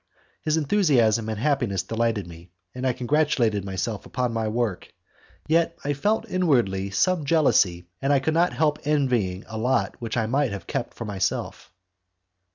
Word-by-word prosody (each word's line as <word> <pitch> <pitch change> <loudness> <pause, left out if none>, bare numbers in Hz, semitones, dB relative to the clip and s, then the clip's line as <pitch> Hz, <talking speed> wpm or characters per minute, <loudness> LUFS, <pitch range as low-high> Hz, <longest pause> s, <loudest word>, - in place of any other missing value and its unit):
His 155 0 +1
enthusiasm 135 - +2
and 110 - -3
happiness 120 -8 0
delighted 115 -3 -1
me, 85 0 -13 0.2
and 125 +1 -2
I 130 - +2
congratulated 125 -5 +1
myself 100 +2 -3
upon 125 0 -2
my 115 -1 -1
own 110 - -3
work. 115 -6 -2 0.6
Yet 165 +1 +2
I 145 - 0
felt 205 +11 0
inwardly 120 - +1
some 180 - +1
jealousy, 135 - +2 0.2
and 135 - +1
I 140 - +5
could 155 +4 -1
not 170 +2 +3
help 150 -1 +1
envying 125 -11 0
a 110 -1 -6
lot 125 +4 0
which 115 0 -3
I 110 - +1
might 135 +4 +1
have 100 -4 -6
kept - - -4
for 115 - -6
myself. 100 -3 -3
120 Hz, 165 wpm, -24 LUFS, 105-150 Hz, 0.6 s, I